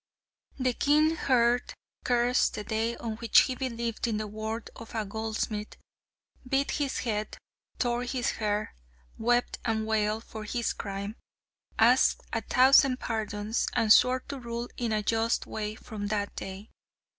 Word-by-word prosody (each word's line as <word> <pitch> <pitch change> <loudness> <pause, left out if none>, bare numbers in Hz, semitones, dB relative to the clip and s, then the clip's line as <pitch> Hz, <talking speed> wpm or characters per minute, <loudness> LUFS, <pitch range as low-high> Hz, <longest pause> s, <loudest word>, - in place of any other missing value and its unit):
The 255 -2 +1
king 305 +5 +3
heard, 245 -4 +2 0.3
cursed 245 0 +2
the 210 - -4
day 225 +2 -1
on 220 -2 -5
which 230 0 +6
he 260 - -1
believed 235 -3 -3
in 220 -2 -1
the 215 - -2
word 220 +2 -5
of 230 0 -10
a 220 -1 -1
goldsmith, 215 0 -3 0.7
beat 275 +1 +1
his 285 -3 -1
head, 215 -3 -3 0.4
tore 240 -1 0
his 250 0 -1
hair, 210 -1 -2 0.5
wept 240 +2 +1
and 220 -1 0
wailed 220 0 0
for 220 -2 -8
his 235 +2 -1
crime, 200 +1 -5 0.6
asked 240 +4 +4
a 225 - 0
thousand 255 +2 +5
pardons, 215 -1 -2
and 225 -3 +6
swore 255 +1 +4
to 280 +1 -7
rule 235 0 -5
in 235 -2 -2
a 215 -1 0
just 225 +2 +1
way 215 0 -4
from 210 -2 -6
that 205 -1 -2
day. 195 +3 -7
225 Hz, 150 wpm, -28 LUFS, 215-245 Hz, 0.7 s, which